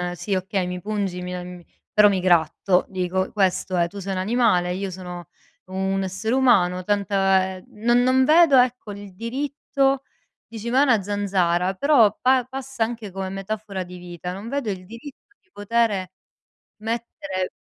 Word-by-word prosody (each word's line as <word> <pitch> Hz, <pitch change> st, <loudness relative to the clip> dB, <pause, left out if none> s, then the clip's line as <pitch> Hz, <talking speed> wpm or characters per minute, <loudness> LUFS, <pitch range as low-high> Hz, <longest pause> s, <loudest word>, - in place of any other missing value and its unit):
sì, 195 Hz, +2 st, -2 dB
okay, 185 Hz, 0 st, -1 dB
mi 180 Hz, 0 st, -4 dB
pungi, 200 Hz, -3 st, -3 dB
mi 180 Hz, 0 st, -5 dB
am 180 Hz, -1 st, -8 dB, 0.3 s
però 210 Hz, -1 st, +6 dB
mi 190 Hz, -2 st, +1 dB
gratto, 180 Hz, +1 st, +2 dB
dico 185 Hz, 0 st, -2 dB
questo 190 Hz, -2 st, +1 dB
è. 170 Hz, -1 st, +2 dB
Tu 200 Hz, +2 st, -9 dB
sei 195 Hz, 0 st, -4 dB
un 185 Hz, -, -2 dB
animale, 190 Hz, -4 st, +2 dB
io 195 Hz, 0 st, -4 dB
sono 180 Hz, -2 st, -8 dB, 0.4 s
un 190 Hz, +1 st, -1 dB
essere 190 Hz, +6 st, -2 dB
umano, 185 Hz, -9 st, +3 dB
tanta 195 Hz, -1 st, +1 dB
ehm, 185 Hz, -, -14 dB
non 240 Hz, +3 st, +2 dB
non 260 Hz, +1 st, +4 dB
vedo, 310 Hz, -1 st, +6 dB
ecco, 250 Hz, -4 st, +2 dB
il 200 Hz, -1 st, -9 dB
diritto, 275 Hz, +3 st, -1 dB, 0.4 s
dici: 225 Hz, +1 st, -6 dB
"Ma 260 Hz, +3 st, +3 dB
è -, -, +6 dB
una 230 Hz, -7 st, +3 dB
zanzara", 190 Hz, -3 st, 0 dB
però 235 Hz, -3 st, +4 dB
pa 255 Hz, -1 st, +3 dB
passa 265 Hz, -2 st, -4 dB
anche 225 Hz, -2 st, -4 dB
come 190 Hz, 0 st, -4 dB
metafora 195 Hz, 0 st, -5 dB
di 180 Hz, 0 st, -11 dB
vita, 175 Hz, 0 st, -7 dB
non 195 Hz, +4 st, -7 dB
vedo 275 Hz, -2 st, -2 dB
il 185 Hz, -2 st, -5 dB
diritto 260 Hz, -, -12 dB
di 390 Hz, -, -39 dB
potere 205 Hz, -3 st, 0 dB, 0.7 s
mettere 195 Hz, -5 st, -4 dB
200 Hz, 165 wpm, -23 LUFS, 185-235 Hz, 0.7 s, però